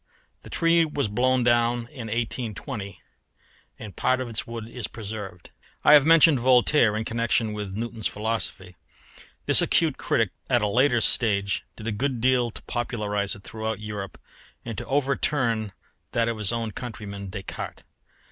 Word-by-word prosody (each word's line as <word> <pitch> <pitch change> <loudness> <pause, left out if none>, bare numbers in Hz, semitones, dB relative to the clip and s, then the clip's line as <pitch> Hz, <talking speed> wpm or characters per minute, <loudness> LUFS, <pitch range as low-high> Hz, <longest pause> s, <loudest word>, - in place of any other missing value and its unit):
The - - -13
tree 170 0 +3
was 145 -5 -1
blown 125 +4 +1
down 120 0 +2
in 125 -6 -8
1820 110 -1 -4 0.8
and 105 -3 -10
part 130 0 +1
of 130 - -3
its 110 -1 -2
wood 115 -1 -6
is 120 0 -6
preserved. 105 -5 -8 0.3
I - - +7
have 145 0 +7
mentioned 165 -3 +6
Voltaire 125 -2 +4
in 110 - -3
connection 115 -1 0
with 105 -2 -5
Newton's 115 0 -2
philosophy. 105 -4 -3 0.7
This - - +8
acute 160 -5 +2
critic 110 -5 +1 0.2
at 120 -4 +2
a - - +2
later 120 +2 +3
stage 100 -5 +1
did 110 - -10
a 110 - -1
good 125 +4 -2
deal 125 0 +2
to - - -10
popularise 105 -4 -2
it 100 - -15
throughout 110 +1 -4
Europe 105 -2 -6 0.5
and 115 -2 -5
to - - -6
overturn 130 -5 0 0.4
that 115 0 +1
of 115 -2 -2
his 105 -1 +2
own 115 -2 -2
countryman 100 -4 -7
Descartes. 100 -1 -7
115 Hz, 155 wpm, -25 LUFS, 105-125 Hz, 0.8 s, This